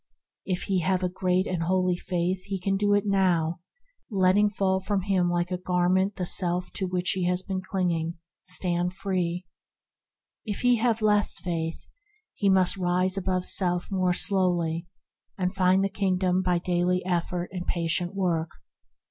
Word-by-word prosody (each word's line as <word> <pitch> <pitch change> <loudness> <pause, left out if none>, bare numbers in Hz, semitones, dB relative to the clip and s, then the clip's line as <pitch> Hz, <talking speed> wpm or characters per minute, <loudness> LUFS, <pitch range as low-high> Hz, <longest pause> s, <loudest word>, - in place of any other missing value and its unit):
If 185 -2 -2
he 190 -2 0
have 185 +2 0
a 180 - +1
great 185 0 0
and 180 -2 -2
holy 185 +1 +1
faith 180 +1 -2
he 195 -1 -3
can 195 +2 0
do 205 +1 +2
it 205 - +1
now, 175 -5 +1 0.5
and, 200 -5 -3
letting 190 +3 +4
fall 190 -2 0
from 195 +1 -1
him 185 -3 +1
like 175 +1 -1
a 180 - -2
gar 180 -1 +1
ment 190 +2 +2
the 180 - -3
self 180 0 0
to 190 - -2
which 180 0 0
he 185 -2 -1
has 180 +1 +1
been 190 -1 -3
clinging, 170 -3 -1 0.3
stand 180 0 0
free. 180 -2 -2 1.0
If 210 -3 -4
he 245 -1 +4
have 225 -1 +1
less 210 -1 +3
faith, 165 -2 -4 0.5
he 200 - +1
must 190 0 +3
rise 185 +1 +1
above 185 -1 -1
self 180 -1 0
more 185 -2 +1
slowly, 175 -3 +1 0.5
and 180 -1 -1
find 185 0 +3
the - - +2
Kingdom 185 -2 0
by 180 -1 +1
daily 180 +1 0
effort 175 0 -2
and 180 -1 -5
patient 175 +2 0
work. 170 -4 0
185 Hz, 170 wpm, -26 LUFS, 175-190 Hz, 1.0 s, letting